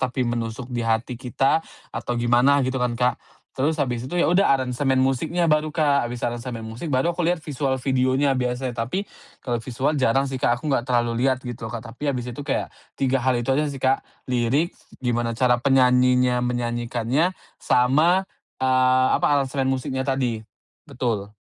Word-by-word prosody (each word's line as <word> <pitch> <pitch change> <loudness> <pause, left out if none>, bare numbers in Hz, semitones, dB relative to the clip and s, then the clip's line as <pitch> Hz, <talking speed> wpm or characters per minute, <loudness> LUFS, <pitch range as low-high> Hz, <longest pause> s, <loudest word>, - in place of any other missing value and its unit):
tapi 130 0 -1
menusuk 120 +1 -4
di 120 - -1
hati 115 +2 -1
kita 135 +4 +1 0.3
atau 120 - -3
gimana, 120 +4 +3
gitu 130 0 -2
kan, 125 -1 0
Kak. 125 0 +1 0.3
Terus 150 +3 0
habis 125 -2 -3
itu 155 - -6
ya 175 -1 +2
udah, 195 +3 +4
aransemen 130 +1 0
musiknya 160 +6 +1
baru, 155 0 +1
Kak. 145 -5 +2
Habis 120 0 -7
aransemen 120 -1 -3
musik, 110 +8 -7
baru 140 +2 +1
aku 170 -1 -1
lihat 175 -2 0
visual 140 -3 -1
videonya 130 +1 +2
biasanya. 125 +1 -1 0.2
Tapi 185 +11 -2 0.4
kalau 120 -2 -1
visual 130 +4 -2
jarang 135 +1 +2
sih, 130 - -3
Kak, 120 - +2
aku 145 +5 -4
enggak 125 -3 0
terlalu 120 0 +1
lihat, 130 -1 +1
gitu, 120 -3 -6
Kak. 115 0 -6
Tapi 120 +5 -7
habis 125 -2 -2
itu 120 - -8
kayak 140 - -1 0.2
3 135 0 +1
hal 130 +1 +2
itu 120 +2 -2
aja 150 +3 +2
sih, 140 -2 -6
Kak, 130 +1 +1 0.2
lirik, 130 +7 +1 0.3
gimana 120 -1 0
cara 125 +1 +3
penyanyinya 125 -1 +3
menyanyikannya, 120 +6 -1 0.2
sama, 155 +10 +3 0.4
eee, 130 0 +4
apa, - - +1
aransemen 135 -1 0
musiknya 130 0 -2
tadi. 130 -5 0 0.5
Betul. 105 -5 -3
130 Hz, 175 wpm, -23 LUFS, 120-135 Hz, 0.5 s, udah